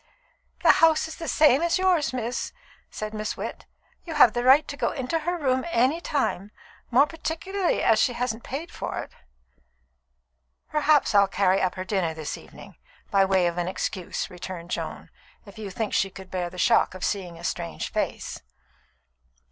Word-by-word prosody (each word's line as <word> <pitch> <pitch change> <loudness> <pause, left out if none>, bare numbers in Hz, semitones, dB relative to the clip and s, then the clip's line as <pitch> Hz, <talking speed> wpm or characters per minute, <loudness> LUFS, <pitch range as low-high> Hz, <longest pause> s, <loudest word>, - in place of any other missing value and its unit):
"The - - +8
house 320 -1 +5
is 320 - -9
the 330 - -6
same 295 -2 +4
as 340 +1 +2
yours, 360 -8 +2
miss," 245 -1 -3 0.4
said 215 0 -6
Miss 215 0 -3
Witt. - - -6 0.4
"You 330 -2 -6
have 235 -7 +7
the 240 - -1
right 270 +4 +6
to 285 - -5
go - - 0
into 265 +5 -2
her 350 +3 -2
room 260 -4 +1
at - - -6
any 260 +7 +2
time, 235 - -1 0.4
more 255 +4 +5
particularly 345 +4 -2
as 225 - +4
she 245 - +3
hasn't 235 -1 -2
paid 310 +6 -5
for - - -5
it." - - -5 1.6
"Perhaps 300 -3 +3
I'll 200 -1 +6
carry 195 0 +2
up 185 - 0
her 185 0 -5
dinner 185 -5 -1
this 155 -2 -4
evening, - - -14 0.3
by 195 -2 +4
way 190 -2 +2
of 175 0 -1
an 175 - -1
excuse," 185 -1 -3
returned 180 -1 -8
Joan - - -5 0.3
"if 200 +1 -13
you 210 -2 -5
think 210 +3 -3
she 195 - +2
could 190 0 -12
bear 180 -2 -2
the 180 - -12
shock 230 0 +3
of 185 - -3
seeing 180 -4 -3
a 170 - -12
strange 170 -1 -4
face." - - -3
230 Hz, 180 wpm, -25 LUFS, 190-300 Hz, 1.6 s, The